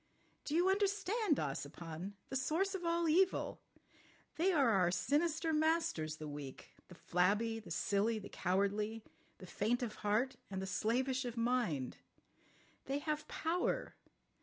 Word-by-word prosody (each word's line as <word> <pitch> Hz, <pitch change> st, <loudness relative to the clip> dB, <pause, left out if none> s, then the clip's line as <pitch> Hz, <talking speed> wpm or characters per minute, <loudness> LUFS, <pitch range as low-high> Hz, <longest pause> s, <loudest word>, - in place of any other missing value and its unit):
"Do 300 Hz, -, -1 dB
you 350 Hz, +2 st, +4 dB
understand, 400 Hz, -, +2 dB
Ossipon? 160 Hz, +6 st, -4 dB, 0.2 s
The -, -, -4 dB
source 330 Hz, +9 st, +1 dB
of 380 Hz, -2 st, -4 dB
all 335 Hz, 0 st, +1 dB
evil! 370 Hz, +4 st, +2 dB, 0.7 s
They 360 Hz, +4 st, +3 dB
are 280 Hz, -9 st, +4 dB
our 185 Hz, -4 st, +4 dB
sinister 315 Hz, -, +1 dB
masters—the 305 Hz, -, +1 dB
weak, 145 Hz, -2 st, -8 dB, 0.2 s
the 180 Hz, -, -12 dB
flabby, 205 Hz, +7 st, +1 dB
the 220 Hz, -, -12 dB
silly, 210 Hz, +3 st, +1 dB
the 205 Hz, -, -7 dB
cowardly, 205 Hz, +4 st, 0 dB, 0.3 s
the 185 Hz, -, -10 dB
faint 225 Hz, +7 st, 0 dB
of 220 Hz, -3 st, -4 dB
heart, 235 Hz, +5 st, +1 dB
and 190 Hz, -1 st, -3 dB
the 190 Hz, -, -3 dB
slavish 255 Hz, +7 st, 0 dB
of 245 Hz, -1 st, -5 dB
mind. 230 Hz, -, 0 dB, 0.9 s
They 275 Hz, -, -1 dB
have 300 Hz, +1 st, -2 dB
power. 355 Hz, +9 st, -1 dB
240 Hz, 135 wpm, -36 LUFS, 190-320 Hz, 0.9 s, you